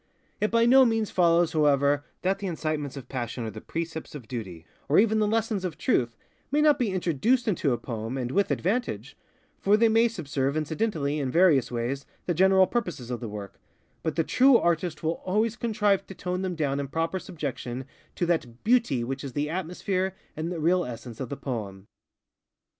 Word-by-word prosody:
It 210 - +1
by 230 0 +3
no 260 +2 +7
means 225 -3 +1
follows, 170 -2 +3
however, 145 -2 +3 0.2
that 190 +1 +1
the 200 - -3
incitements 155 -5 -3
of 135 - -8
PassionŌĆÖ 120 -2 -4
or 110 - -4
the 110 +1 -9
precepts 160 -2 -5
of 125 -6 -9
Duty, 95 -9 -6 0.2
or 145 - +4
even 220 +1 +4
the 210 - +2
lessons 220 -2 0
of 175 -4 -4
Truth, 120 -2 0 0.3
may 290 - +1
not 300 -1 +4
be 240 -4 +1
introduced 190 - +1
into 165 -9 +1
a 120 - +1
poem, 115 +1 -5
and 125 -1 -3
with 200 +4 +2
advantage; 240 +8 -1 0.4
for 205 +2 +4
they 230 +1 +4
may 225 +2 +4
subserve 145 - -2
incidentally, 155 -2 -1
in 135 -3 -1
various 160 -5 +4
ways, 125 +4 -3 0.2
the 175 - 0
general 190 +2 +5
purposes 175 - -3
of 120 - -3
the 115 - -5
work: 105 -2 -8 0.4
but 160 - -2
the 165 - +2
true 255 - +5
artist 170 -3 0
will 160 +1 -1
always 215 +4 +1
contrive 210 -4 +1
to 195 - -9
tone 180 +1 -3
them 185 -2 -2
down 140 -3 -1
in 140 - -3
proper 165 +5 -1
subjection 135 -7 -5 0.3
to 175 - 0
that 125 -9 -2
_Beauty 225 - +3
_which 135 +3 -4
is 135 -3 -6
the 150 +3 -1
atmosphere 185 +2 -2 0.2
and 160 +3 -3
the 175 - -4
real 175 +3 +3
essence 120 -3 -8
of 130 -3 -4
the 140 - -5
poem. 100 -7 -5
165 Hz, 195 wpm, -27 LUFS, 135-195 Hz, 0.4 s, no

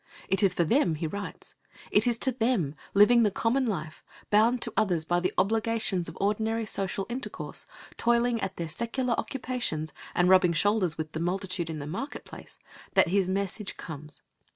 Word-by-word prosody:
It 195 - +2
is 190 -3 +3
for 175 - +3
them 175 - +2
he 160 - -3
writes. 200 +6 -6 0.4
It - - +4
is 235 -1 +2
to 260 - +1
them, 225 - 0 0.2
living 235 +4 +7
the 215 - +4
common 240 +6 +1
life, 155 -7 -4 0.3
bound 225 +4 +4
to 230 - +2
others 180 -7 +1
by 175 +2 +1
the 185 +1 0
obligations 220 -2 +1
of - - -11
ordinary 220 +3 0
social 195 -1 -1
intercourse, 250 +3 -5 0.3
toiling 235 0 +2
at 190 - -4
their 170 - -3
secular 235 - -1
occupations, 240 - -3 0.2
and 175 - +3
rubbing 185 -2 +5
shoulders 185 -2 +2
with 155 -1 -4
the 160 - -4
multitude 185 0 -1
in 160 - -4
the 145 - -5
market 190 - -5
place, - - -12 0.4
that - - +5
his 190 0 +2
message 195 +1 -2
comes. 150 -2 -9
200 Hz, 175 wpm, -28 LUFS, 175-230 Hz, 0.4 s, living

